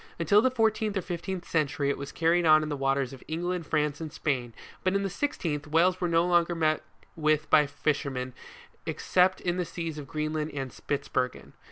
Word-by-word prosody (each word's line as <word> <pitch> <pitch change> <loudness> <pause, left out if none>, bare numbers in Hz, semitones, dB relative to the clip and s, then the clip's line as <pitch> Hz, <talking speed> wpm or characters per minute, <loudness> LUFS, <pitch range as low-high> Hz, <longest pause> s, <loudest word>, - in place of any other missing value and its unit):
Until 170 +6 +4
the 260 - +3
fourteenth 220 -4 +1
or 190 - -1
fifteenth 175 0 -4
century 145 -3 +1
it - - -3
was 140 0 -6
carried 170 +1 +2
on 155 -1 +6
in 155 - -3
the 145 - -1
waters 135 -1 0
of 130 - -11
England, 175 +1 -2
France 150 0 0
and 155 -2 -5
Spain; 130 -6 -2 0.3
but 185 +1 +1
in 200 - +1
the 195 - -2
sixteenth, 165 - -2
whales 175 +4 +3
were 175 - +2
no 165 0 +3
longer 175 -1 +3
met 155 -1 +1 0.3
with 155 -1 +1
by 150 -2 +6
fishermen 140 -3 -2 0.5
except 185 +1 +2
in 175 0 -1
the 180 - +1
seas 165 -3 -5
of 140 - -8
Greenland 155 +1 -2
and 135 -2 -3
Spitzbergen. 130 -3 -3
155 Hz, 195 wpm, -28 LUFS, 145-175 Hz, 0.5 s, on